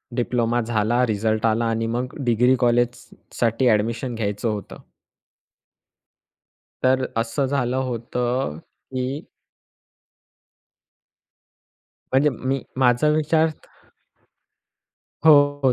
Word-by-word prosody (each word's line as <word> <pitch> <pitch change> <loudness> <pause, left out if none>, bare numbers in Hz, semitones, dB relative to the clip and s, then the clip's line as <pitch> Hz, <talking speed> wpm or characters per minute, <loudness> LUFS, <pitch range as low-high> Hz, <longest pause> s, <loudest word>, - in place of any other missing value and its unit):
Diploma 120 -1 0
झाला, 115 +2 +1
result 110 0 0
आला 115 +1 +1
आणि 115 0 -1
मग 125 +2 -3
डिग्री 125 +2 +3
कॉलेज 120 0 +3
स - - -18 0.3
साठी 115 +2 +2
ॲडमिशन 115 +3 0
घ्यायचं 105 0 -2
होतं. 105 -2 -5 2.1
तर 130 0 +3
असं 115 +4 0
झालं 130 -2 -1
होतं 125 - -2 0.3
की 130 +4 -3 2.9
म्हणजे, 140 +3 +4
मी 130 +2 -2 0.2
माझा 125 +3 +3
विचार 155 +1 +2
तर 155 - -15 1.4
हो. 145 -3 +5
120 Hz, 90 wpm, -22 LUFS, 115-130 Hz, 2.9 s, हो